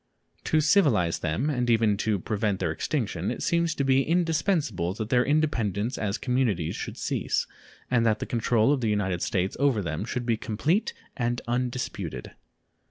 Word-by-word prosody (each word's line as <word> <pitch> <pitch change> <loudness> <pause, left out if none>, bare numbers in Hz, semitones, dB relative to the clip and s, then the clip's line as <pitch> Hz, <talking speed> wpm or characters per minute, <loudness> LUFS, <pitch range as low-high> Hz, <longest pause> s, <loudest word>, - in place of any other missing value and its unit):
To 155 - +3
civilize 140 - +3
them, 90 - -1
and 125 -5 0
even 110 -3 +3
to 105 0 0
prevent 100 0 -1
their - - 0
extinction, - - -2
it - - -4
seems 170 -1 +1
to 140 - 0
be 135 0 +4
indispensable 160 - 0
that 110 0 -4
their 125 0 +4
independence 125 - 0
as 105 -1 -2
communities 120 -11 0
should - - -6
cease, - - -1 0.5
and 120 -2 +3
that 110 -2 +3
the - - -4
control 115 +2 +2
of 135 - -1
the 115 - +1
United 95 -4 0
States 95 0 -1
over 135 -7 +2
them 80 +1 -3
should 125 0 -3
be 115 -2 +1
complete 150 - 0 0.2
and 120 0 -1
undisputed. 120 - -3
115 Hz, 165 wpm, -26 LUFS, 105-135 Hz, 0.5 s, be